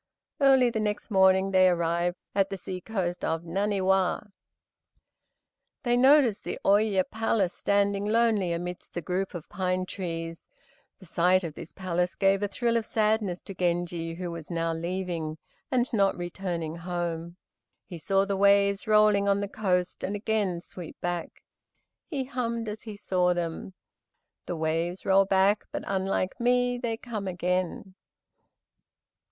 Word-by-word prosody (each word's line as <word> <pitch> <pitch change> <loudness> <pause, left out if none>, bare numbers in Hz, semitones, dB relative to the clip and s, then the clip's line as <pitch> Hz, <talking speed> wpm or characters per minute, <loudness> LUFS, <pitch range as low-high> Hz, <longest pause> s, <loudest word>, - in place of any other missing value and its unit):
Early 265 -3 +5
the 220 - -2
next 210 +1 -2
morning 190 0 +4
they 185 -1 +6
arrived 170 +1 0 0.2
at 195 -1 +2
the 195 - -4
sea 185 0 -6
coast 180 -4 -3
of 160 +1 -1
Naniwa. 190 +2 0 1.5
They 240 -1 +2
noticed 255 -4 +5
the - - -4
Ôye 200 -1 +4
Palace 220 -4 0
standing 200 0 +1
lonely 215 -4 +2
amidst 175 +1 -5
the 175 - -3
group 185 +3 -2
of 165 - -7
pine 185 0 -1
trees. 165 -3 -5 0.5
The 190 - -15
sight 180 +2 +2
of 165 -3 -4
this 155 - -9
palace 180 -1 -2
gave 195 0 +2
a 205 - +1
thrill 235 +3 0
of 225 - -2
sadness 215 -4 0
to 195 - -8
Genji, 175 -2 -1
who 175 0 -5
was 165 -2 -8
now 165 -1 -1
leaving, 170 -2 -3 0.3
and 250 -1 +2
not 195 -3 +2
returning, 175 -2 -4
home. 170 -1 -4 0.5
He 175 - -8
saw 195 +3 +2
the 200 0 -1
waves 200 +1 +3
rolling 210 -2 +4
on 200 0 +3
the 200 - -2
coast 185 -3 -1
and 200 - -2
again 205 -4 -1
sweep 175 -2 -10
back. 175 -1 -4 0.6
He 280 -5 -2
hummed, 235 -3 -3
as 210 +1 -5
he 215 -2 -8
saw 180 -3 +1
them: 175 +2 -4 0.7
"The 175 - -2
waves 165 +3 -2
roll 195 0 +5
back, 195 +2 +3
but - - -4
unlike 190 -1 -1
me, 245 0 +2
They 230 -2 -2
come 220 -5 -5
again." 180 +1 -2
190 Hz, 150 wpm, -27 LUFS, 175-210 Hz, 1.5 s, they